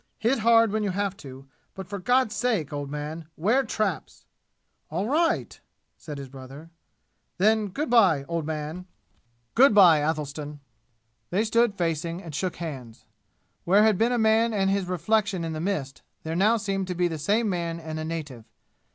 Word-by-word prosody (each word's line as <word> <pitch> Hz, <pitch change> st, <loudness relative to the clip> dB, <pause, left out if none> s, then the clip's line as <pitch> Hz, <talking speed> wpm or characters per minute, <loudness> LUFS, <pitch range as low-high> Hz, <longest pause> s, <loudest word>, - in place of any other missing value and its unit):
Hit 235 Hz, +4 st, +1 dB
hard 230 Hz, 0 st, +4 dB
when 215 Hz, +1 st, -1 dB
you 205 Hz, -, -1 dB
have 195 Hz, +1 st, -2 dB
to, 135 Hz, -5 st, -11 dB, 0.3 s
but 190 Hz, -2 st, -7 dB
for 200 Hz, +1 st, -5 dB
God's 245 Hz, +2 st, +2 dB
sake, 210 Hz, -, -1 dB
old 145 Hz, -1 st, -4 dB
man, 150 Hz, +2 st, -6 dB
ware 225 Hz, +11 st, +2 dB
traps!" 215 Hz, -6 st, -3 dB, 0.6 s
"All 180 Hz, +7 st, -2 dB
right," 325 Hz, +6 st, 0 dB, 0.4 s
said 150 Hz, -3 st, -9 dB
his 140 Hz, -1 st, -7 dB
brother. 135 Hz, +5 st, -12 dB, 0.7 s
"Then 215 Hz, +2 st, +3 dB
good 285 Hz, -, -3 dB
by, 190 Hz, -, +4 dB
old 165 Hz, +2 st, -3 dB
man!" 160 Hz, +3 st, -5 dB, 0.7 s
"Good 250 Hz, -2 st, +5 dB
by, 175 Hz, -6 st, +7 dB
Athelstan!" 150 Hz, -1 st, -3 dB, 0.7 s
They 195 Hz, +5 st, +1 dB
stood 230 Hz, -1 st, +2 dB
facing 165 Hz, -1 st, -2 dB
and 165 Hz, -3 st, -9 dB
shook 180 Hz, +5 st, -2 dB
hands. 130 Hz, -9 st, -8 dB, 0.6 s
Where 200 Hz, +4 st, +4 dB
had 215 Hz, -4 st, +3 dB
been 230 Hz, +2 st, +3 dB
a 245 Hz, -, +1 dB
man 220 Hz, +1 st, +3 dB
and 195 Hz, -2 st, +1 dB
his 195 Hz, -1 st, 0 dB
reflection 195 Hz, +1 st, 0 dB
in 165 Hz, -1 st, -3 dB
the 155 Hz, -, -4 dB
mist, 155 Hz, -8 st, -3 dB, 0.2 s
there 160 Hz, +1 st, -4 dB
now 210 Hz, +6 st, +3 dB
seemed 195 Hz, -3 st, -2 dB
to 180 Hz, -, -3 dB
be 175 Hz, 0 st, +1 dB
the 160 Hz, -2 st, -5 dB
same 210 Hz, +9 st, +1 dB
man 170 Hz, -3 st, -2 dB
and 160 Hz, -1 st, -6 dB
a -, -, -3 dB
native. 150 Hz, -8 st, -6 dB
180 Hz, 175 wpm, -26 LUFS, 155-215 Hz, 0.7 s, by